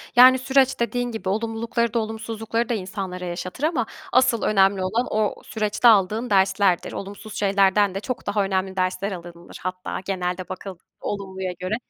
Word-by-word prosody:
Yani, 255 Hz, +1 st, +8 dB
süreç 265 Hz, -1 st, +2 dB
dediğin 245 Hz, +1 st, -1 dB
gibi, 220 Hz, -4 st, -4 dB
olumlulukları 225 Hz, +2 st, -1 dB
da 235 Hz, -, +2 dB
olumsuzlukları 225 Hz, +1 st, -3 dB
da 240 Hz, -, +1 dB
insanlara 190 Hz, -2 st, -4 dB
yaşatır 180 Hz, +8 st, -5 dB
ama 305 Hz, -7 st, +1 dB, 0.3 s
asıl 245 Hz, -2 st, +4 dB
önemli 195 Hz, -2 st, +3 dB
olan 225 Hz, +7 st, 0 dB
o 215 Hz, -1 st, 0 dB
süreçte 215 Hz, +2 st, +1 dB
aldığın 215 Hz, +3 st, +4 dB
derslerdir. 190 Hz, -2 st, +2 dB
Olumsuz 205 Hz, +2 st, -7 dB
şeylerden 195 Hz, 0 st, +3 dB
de 195 Hz, -, -1 dB
çok 245 Hz, 0 st, -5 dB
daha 205 Hz, 0 st, +1 dB
önemli 190 Hz, 0 st, -1 dB
dersler 185 Hz, +2 st, -1 dB
alınılır 175 Hz, -1 st, -9 dB
hatta 185 Hz, 0 st, -4 dB
genelde 180 Hz, -1 st, -3 dB
bakıl 190 Hz, +1 st, -6 dB, 0.3 s
olumluya 190 Hz, -2 st, -4 dB
göre 185 Hz, +4 st, -1 dB
205 Hz, 155 wpm, -23 LUFS, 190-230 Hz, 0.3 s, Yani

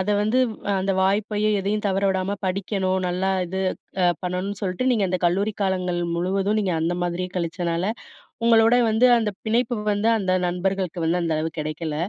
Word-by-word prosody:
அத 185 Hz, -, -2 dB
வந்து 215 Hz, +4 st, +1 dB, 0.3 s
அ -, -, +2 dB
அந்த 195 Hz, +1 st, 0 dB
வாய்ப்பையும் 210 Hz, +2 st, +1 dB
எதையும் 210 Hz, +2 st, -2 dB
தவற 195 Hz, 0 st, 0 dB
விடாம 190 Hz, +2 st, -1 dB
படிக்கணும், 190 Hz, 0 st, -1 dB
நல்லா 185 Hz, +2 st, 0 dB, 0.2 s
இது 190 Hz, +2 st, -3 dB, 0.4 s
அ -, -, +4 dB, 0.2 s
பண்ணணுன் 185 Hz, +2 st, -3 dB
சொல்ட்டு, 190 Hz, +7 st, -1 dB
நீங்க 210 Hz, -5 st, +1 dB
அந்த 185 Hz, -1 st, -1 dB
கல்லூரி 200 Hz, +5 st, 0 dB
காலங்கள் 185 Hz, -2 st, 0 dB, 0.2 s
முழுவதும் 195 Hz, +4 st, 0 dB
நீங்க 190 Hz, -3 st, 0 dB
அந்த 170 Hz, +2 st, 0 dB
மாரியே 175 Hz, +1 st, -3 dB
கழிச்சனால 170 Hz, +1 st, -1 dB, 0.6 s
உங்களோட 225 Hz, 0 st, +5 dB, 0.2 s
வந்து, 220 Hz, +3 st, +4 dB
அந்த 220 Hz, -2 st, 0 dB, 0.2 s
பிணைப்பு 240 Hz, +2 st, +1 dB, 0.2 s
வந்து 205 Hz, +3 st, +1 dB
அந்த 185 Hz, -3 st, 0 dB
நண்பர்களுக்கு 180 Hz, -1 st, -2 dB
வந்து 175 Hz, +2 st, +1 dB
அந்த 165 Hz, -1 st, 0 dB
அளவு 160 Hz, +1 st, -2 dB
கிடைக்கல. 155 Hz, +1 st, -4 dB
190 Hz, 170 wpm, -23 LUFS, 180-205 Hz, 0.6 s, உங்களோட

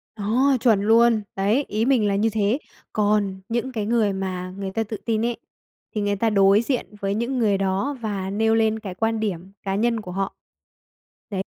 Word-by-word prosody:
Đó, 250 Hz, +6 st, +2 dB
chuẩn 220 Hz, -5 st, +4 dB
luôn! 225 Hz, +1 st, +4 dB
Đấy, 210 Hz, +9 st, +1 dB
ý 215 Hz, +2 st, 0 dB
mình 250 Hz, -6 st, +3 dB
là 200 Hz, -, +1 dB
như 215 Hz, +3 st, +2 dB
thế. 215 Hz, +4 st, +1 dB, 0.3 s
Còn 205 Hz, -2 st, +1 dB
những 240 Hz, +3 st, -1 dB
cái 215 Hz, -4 st, -3 dB
người 220 Hz, -3 st, +2 dB
mà 185 Hz, -1 st, -4 dB
người 195 Hz, -1 st, -4 dB
ta 225 Hz, +2 st, -1 dB
tự 215 Hz, 0 st, -6 dB
tin 225 Hz, -1 st, +1 dB
ấy, 240 Hz, -1 st, -1 dB, 0.6 s
thì 210 Hz, -, 0 dB
người 205 Hz, 0 st, 0 dB
ta 225 Hz, +3 st, +1 dB
đối 200 Hz, 0 st, +5 dB
diện 235 Hz, -3 st, -3 dB
với 195 Hz, 0 st, 0 dB
những 235 Hz, +4 st, -1 dB
người 210 Hz, -4 st, +3 dB
đó 195 Hz, +9 st, -1 dB
và 200 Hz, -4 st, -3 dB
nêu 225 Hz, +3 st, +2 dB
lên 220 Hz, 0 st, +2 dB
cái 195 Hz, -4 st, -7 dB
quan 225 Hz, +2 st, 0 dB
điểm 190 Hz, -3 st, -3 dB
cá 195 Hz, -1 st, -1 dB
nhân 230 Hz, +2 st, +1 dB
của 180 Hz, -, -8 dB
họ. 195 Hz, +1 st, -3 dB, 0.9 s
Đấy, 195 Hz, -3 st, -2 dB
215 Hz, 200 wpm, -23 LUFS, 195-230 Hz, 0.9 s, đối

